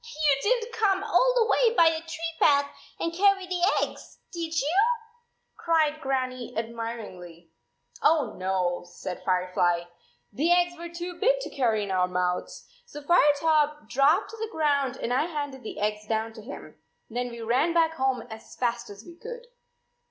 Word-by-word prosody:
"You 300 -10 +1
didn 480 - +2
t 450 - -8
come 400 -4 +1
all - - +3
the 460 - +4
way 465 +1 +3
by 330 -5 +6
the 320 - -2
tree 330 0 -5
path 285 -1 +4 0.3
and 335 - -2
carry 390 +1 +3
the 360 -1 -3 0.2
eggs, - - -8 0.2
did 330 -2 -2
you?" 300 +6 -1 0.8
cried 310 -2 +1
Grannie 255 -3 -3
admiringly. 225 -8 -6 0.5
"Oh, 295 -9 +3
no," 185 -2 -1
said 180 0 -7
Firefly. 180 -2 +1 0.5
"The 310 +11 +1
eggs 350 0 +2
were 340 0 -8
too 345 +1 -7
big - - +3
to - - -6
carry 225 -6 +1
in 200 - -4
our 180 -1 +2
mouths. 180 0 -2 0.2
So 295 -9 -9
Firetop 300 -3 +3
dropped 275 +4 +3
to 450 - -9
the 445 0 -4
ground 280 - +1
and 245 - -2
I 265 +5 +2
handed 285 -5 -5
the 220 - -7
eggs 210 0 -2
down 225 0 -1
to 220 - -11
him. 250 +7 -10 0.3
Then 245 +2 -3
we 235 -1 -8
ran 250 +9 +2
back 325 -1 +3
home 265 -5 0
as 220 -1 -11
fast 240 -1 -2
as 205 +2 -11
we 340 - -12
could." 480 +6 -9
280 Hz, 175 wpm, -27 LUFS, 225-335 Hz, 0.8 s, by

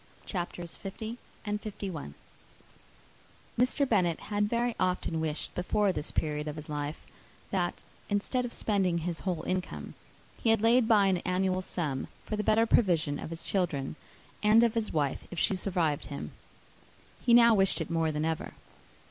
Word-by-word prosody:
_]] - - -24
CHAPTER 175 -2 -4
L. 205 - -6 1.5
Mr. 255 +3 +3
Bennet 180 -8 +2
had 205 0 -1
very 235 +1 0
often 180 -3 0
wished, 155 -1 -2
before 195 +3 +1
this 150 - -4
period 150 -1 -1
of 150 - -3
his 155 -1 -7
life, 150 0 -4 0.5
that, 180 -3 -1 0.3
instead 210 +5 0
of 245 - -4
spending 195 -7 +1
his 170 -2 -2
whole 180 -4 -2
income, 185 0 -3 0.5
he 230 - +2
had 225 -1 +3
laid 235 +1 +5
by 210 -3 +5
an 190 -2 +3
annual 185 +1 0
sum, 150 -8 -2 0.2
for 215 - -2
the 210 - -1
better 220 +2 +4
provision 165 -10 +2
of - - -6
his 165 0 -6
children, 160 -8 -1 0.5
and 215 +2 +6
of 230 -2 +3
his 225 -2 -1
wife, 145 -4 0
if 175 - -8
she 195 - +2
survived 175 -6 0
him. 75 +2 -6 0.9
He 235 -1 +6
now 235 -1 +8
wished 195 -3 +3
it 165 0 -4
more 165 -1 +1
than 150 +1 -1
ever. 160 0 -2
185 Hz, 160 wpm, -30 LUFS, 160-215 Hz, 1.5 s, now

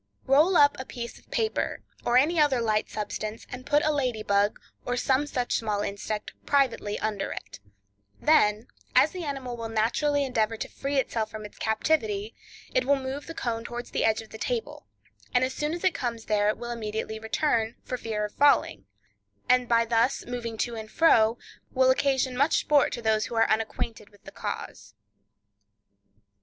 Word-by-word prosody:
—Roll 305 +7 +5
up 285 0 +6
a 260 - -5
piece 235 -2 -7
of - - -27
paper, 445 -1 -1 0.2
or 240 +1 +3
any 315 +6 +3
other 290 -4 +4
light 215 -2 0
substance 215 +1 -5
and 255 +1 -8
put 295 0 +3
a 310 - +3
lady 250 -7 -1
bug, 200 0 +2 0.2
or 245 0 -2
some 265 +3 +1
such 250 -3 -2
small 210 -2 -1
insect, 205 +1 -4
privately 255 -7 +1
under 210 -2 -2
it; 105 0 -8 0.6
then, 215 -8 +3 0.3
as - - +6
the 365 -2 -6
animal 270 -5 -4
will 230 -1 -5
naturally 280 +6 +1
endeavor 225 -3 0
to - - -4
free 280 +1 -3
itself 225 -4 0
from 215 0 -8
its 210 - -12
captivity, 220 -3 0 0.4
it 255 - +3
will 280 +3 +3
move 270 +1 -5
the 330 - -7
cone 230 -5 -2
towards 240 +1 -6
the - - 0
edge 220 0 +2
of 220 - -18
the 220 - -9
table, 480 -2 -3 0.5
and 245 - +5
as 260 0 0
soon 300 +1 -2
as 345 +2 -5
it 370 -2 +3
comes 235 -3 -4
there, 210 0 +2
will 240 0 -6
immediately 220 -1 -4
return, 225 0 0
for 255 - -4
fear 220 -3 -3
of 210 - -8
falling; 275 - +3 0.6
and 250 -1 +3
by 230 -1 +4
thus 230 +3 +1
moving 235 -2 -5
to 240 +2 -1
and 220 -1 -7
fro, 230 -8 +4 0.3
will 260 0 +4
occasion 265 -1 +1
much 280 +5 +3
sport 290 -2 +3
to 235 - -5
those 220 -1 +2
who 235 - -6
are 225 - +4
unacquainted 220 -1 -2
with 205 -1 -23
the - - -11
cause. - - -6
235 Hz, 185 wpm, -27 LUFS, 220-275 Hz, 0.6 s, up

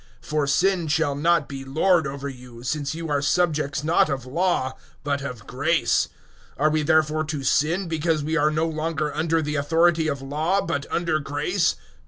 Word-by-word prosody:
006:014 - - -16
For 150 -2 +1
Sin 175 +4 +2
shall 155 -1 +1
not 165 +1 +2
be 135 -1 -7
lord 160 +4 +2
over 140 +1 -5
you, 125 -3 -10
since 145 +2 -2
you 165 0 -5
are 145 -1 +1
subjects 150 -2 0
not 160 +2 +3
of 135 -3 -3
Law, 130 -2 0 0.3
but 140 -1 -1
of 125 -6 -6
grace. 155 +6 +1 0.5
006:015 140 - -2
Are 155 - +5
we 155 0 +1
therefore 155 0 +2
to 150 -3 -4
sin 165 +8 +1
because 160 -1 0
we 155 +2 -1
are 155 -2 +3
no 155 +1 0
longer 155 -1 -2
under 160 +1 +1
the 150 0 -2
authority 160 +2 +2
of 140 -3 -3
Law, 155 +8 0
but 145 -5 -3
under 170 -2 0
grace? 150 +5 0
155 Hz, 190 wpm, -24 LUFS, 140-165 Hz, 0.5 s, Are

